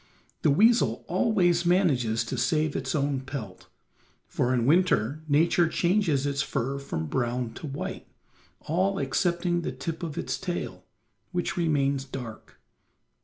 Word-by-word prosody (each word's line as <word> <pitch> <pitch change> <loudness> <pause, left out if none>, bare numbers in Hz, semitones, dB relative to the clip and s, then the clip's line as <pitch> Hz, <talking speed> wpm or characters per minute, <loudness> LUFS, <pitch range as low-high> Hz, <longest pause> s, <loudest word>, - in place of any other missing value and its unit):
The - - +3
weasel 195 - +3
always 180 -3 +2
manages 140 - +2
to 115 - -4
save 155 -3 +1
its - - -2
own 140 -2 0
pelt, 130 -8 -7 0.6
for 125 - 0
in 120 -2 +1
winter 155 - +2
Nature 165 +3 +3
changes 170 -5 +1
its 140 -1 0
fur 135 +1 -2
from 80 -13 -4
brown 120 - -2
to 155 - -7
white, 140 0 -5 0.5
all 190 +5 0
excepting 175 +5 0
the 145 - -3
tip 155 +5 -5
of 160 -4 -5
its - - -2
tail, 180 -2 -4 0.5
which 175 -1 -2
remains 140 -5 +1
dark. 125 -5 -9
145 Hz, 135 wpm, -27 LUFS, 130-175 Hz, 0.6 s, The